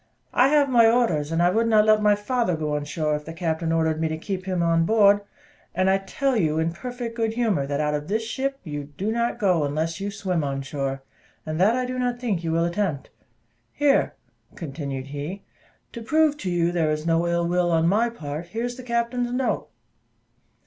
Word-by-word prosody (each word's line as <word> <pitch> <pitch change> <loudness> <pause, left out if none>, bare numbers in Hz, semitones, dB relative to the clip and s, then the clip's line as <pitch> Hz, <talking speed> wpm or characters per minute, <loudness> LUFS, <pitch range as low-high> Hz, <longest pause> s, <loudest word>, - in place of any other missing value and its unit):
I 250 - +5
have 290 0 +4
my 235 -4 +5
orders, 195 -11 +1
and 165 +1 +2
I 175 - +4
would 225 +4 +1
not 215 -2 +5
let 215 0 +4
my 210 -1 +4
father 205 -2 0
go 155 -1 -2
on 145 0 -2
shore, 150 0 -1
if 150 0 -6
the 165 - -7
captain 165 -1 -2
ordered 160 -1 +1
me 160 - +1
to 160 0 -3
keep 185 +2 -5
him 180 -2 0
on 165 0 +3
board; 205 +1 +4 0.5
and 185 +1 +3
I 195 - +3
tell 265 +7 -1
you, 160 -8 +1
in 160 +1 +1
perfect 245 +4 -6
good 225 -1 -1
humour, 215 - 0
that 140 0 -2
out 150 0 0
of 150 0 -3
this 220 +4 -1
ship 270 +4 -2
you 145 -3 -5
do 205 +3 -1
not 235 +1 0
go, 185 -8 +2
unless 155 +3 -2
you 200 - -2
swim 190 -5 -2
on 135 -1 -2
shore, 135 -1 -4 0.4
and 155 +2 -2
that 215 +5 +4
I 255 0 0
do 255 0 -4
not 245 -1 -1
think 210 -9 -2
you 165 - -1
will 165 +1 +2
attempt. 170 -6 -2 0.6
Here," 285 -1 +2 0.4
continued 140 -4 -5
he, 145 +8 -6 0.5
"to 235 - -7
prove 305 +5 +2
to 190 - -4
you 175 -1 +1
there 165 -3 +1
is 155 0 -2
no 165 +1 +2
ill 170 0 +1
will 175 0 +1
on 165 0 +3
my 220 +6 +3
part, 160 -6 -6
here 225 +6 -4
is 245 0 -3
the - - -7
captain's 240 0 -1
note." 250 +1 -1
180 Hz, 220 wpm, -24 LUFS, 160-230 Hz, 0.6 s, I